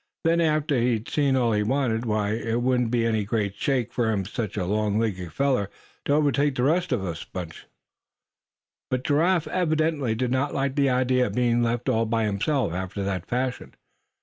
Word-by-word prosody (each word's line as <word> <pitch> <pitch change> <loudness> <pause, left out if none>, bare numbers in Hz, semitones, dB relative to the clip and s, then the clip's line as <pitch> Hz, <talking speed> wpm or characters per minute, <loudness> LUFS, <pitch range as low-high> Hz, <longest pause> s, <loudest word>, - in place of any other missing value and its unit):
Then, 165 +1 +3
after 155 -4 +1
he'd 120 -2 0
seen 140 -3 +1
all 120 -3 +2
he 105 -1 +1
wanted, 120 0 0
why 105 -1 0
it 115 +2 -1
wouldn't 125 -2 +2
be 115 -1 +1
any 110 -2 +1
great 100 -1 -1
shake 125 +2 -1
for 110 -5 0
such 105 +1 -4
a 95 - -1
long 105 +2 0
legged 95 -7 -2
feller 130 - 0 0.4
to 140 - +2
overtake 145 -1 +2
the 125 - 0
rest 170 +5 +1
of 120 -7 0
the 85 -3 -4
bunch." 85 -3 -7 1.2
But 130 0 -1
Giraffe 165 +4 +2
evidently 155 -8 0
did 125 +1 -1
not 130 +3 0
like 135 -1 -1
the 140 -2 +3
idea 125 0 +2
of - - -6
being 120 -1 +2
left 120 +1 -1
all 115 -3 +1
by 115 0 0
himself 105 - 0
after 95 +2 -4
that 95 -2 -3
fashion. 125 +1 -3
120 Hz, 185 wpm, -25 LUFS, 105-140 Hz, 1.2 s, Then